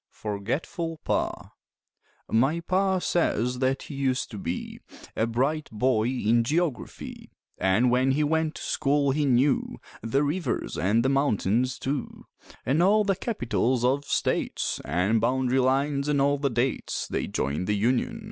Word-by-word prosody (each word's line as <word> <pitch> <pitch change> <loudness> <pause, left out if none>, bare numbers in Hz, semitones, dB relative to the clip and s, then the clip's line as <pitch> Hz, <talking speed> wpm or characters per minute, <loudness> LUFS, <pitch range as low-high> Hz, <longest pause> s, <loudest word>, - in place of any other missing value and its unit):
FORGETFUL 135 - -4
PA - - -2 0.8
My 135 +9 +2
Pa 190 +2 +1
says 125 - 0
that 130 +1 0
he - - -9
used 135 -2 -1
to 105 - -6
be 90 -2 -5 0.4
A 110 - +1
bright 140 +7 -1
boy 110 0 +1
in 120 -2 +2
geography; 150 - -3 0.3
An' 95 +7 +3
when 130 +2 +3
he 150 +2 +1
went 160 +1 0
to - - -7
school 140 -1 +1
he 150 +2 +1
knew 130 +1 +2 0.2
The 125 +6 +1
rivers 165 +5 -2
an' 105 +8 +2
the 130 - +2
mountains, 130 -3 +1
too, 135 -1 -4 0.4
An' 145 +6 +2
all 210 +4 +4
the 195 -1 +1
capitals 125 - 0
of 140 +3 +1
states - - -1
An' 100 +6 +1
bound'ry 130 +2 +1
lines 140 +2 +1
an' 145 -1 +2
all 140 +1 +2
the 140 -1 +1
dates 125 +2 -1
They - - -2
joined 70 +7 -2
the 105 - +1
union. 125 - 0
130 Hz, 150 wpm, -26 LUFS, 115-150 Hz, 0.8 s, all